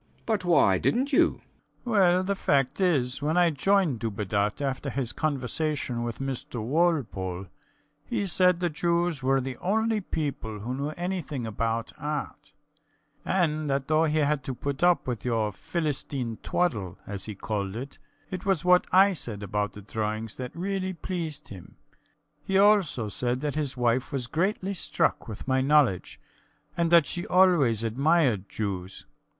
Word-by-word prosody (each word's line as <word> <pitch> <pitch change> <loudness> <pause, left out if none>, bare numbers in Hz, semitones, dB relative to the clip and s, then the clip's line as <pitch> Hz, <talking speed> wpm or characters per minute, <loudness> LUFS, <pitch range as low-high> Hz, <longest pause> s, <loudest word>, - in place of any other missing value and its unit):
B. - - -38
B. - - -35
But 215 -5 0
why 95 - +4
didnt 265 +4 +1
you? - - +3 0.4
SCHUTZMACHER. 245 - -4
Well, 185 -3 +4
the 200 +2 0
fact 140 -3 +1
is, 140 -8 +1
when 155 +4 0
I 175 -1 +5
joined 160 - +2
Dubedat 105 -1 -1
after 135 -2 -2
his 130 -3 -3
conversation 145 -3 -2
with 120 -1 -3
Mr 135 -3 -4
Walpole, 115 - 0 0.6
he 205 +3 -2
said 180 -1 +3
the 175 -1 0
Jews 170 -1 0
were 135 +1 +2
the 130 -1 -5
only 220 +3 0
people 140 - -4
who 120 +4 -3
knew 140 +3 -2
anything 175 -8 -3
about 115 +1 -2
art, 150 0 -5 0.7
and 155 -5 0
that 135 0 -1
though 155 +1 +3
he 155 0 0
had 150 -2 +1
to 130 - -3
put 140 +3 -4
up 175 -4 +4
with 125 -3 -3
your 115 -3 0
Philistine 145 - -2
twaddle, 105 - -1
as 100 -2 -6
he 105 - -6
called 100 -1 -3
it, 135 +4 -7 0.3
it 185 -1 -4
was 190 -5 0
what 180 0 +5
I 195 +2 +6
said 110 - -4
about 105 +1 -2
the 105 - -11
drawings 110 0 -3
that 125 -1 -4
really 190 +1 -2
pleased 165 -3 -5
him. 95 -4 -11 0.7
He 190 +3 +1
also 195 - +4
said 125 +4 -1
that 150 -2 -1
his 145 -4 -2
wife 120 +1 +1
was 135 -3 -2
greatly 190 - -1
struck 185 - -1
with 110 +1 -8
my 130 0 +2
knowledge, 135 -9 +2 0.6
and 170 0 +1
that 170 -3 +7
she 175 +6 -3
always 165 - +4
admired 130 - +2
Jews. 95 -3 -4
140 Hz, 165 wpm, -27 LUFS, 115-175 Hz, 0.7 s, that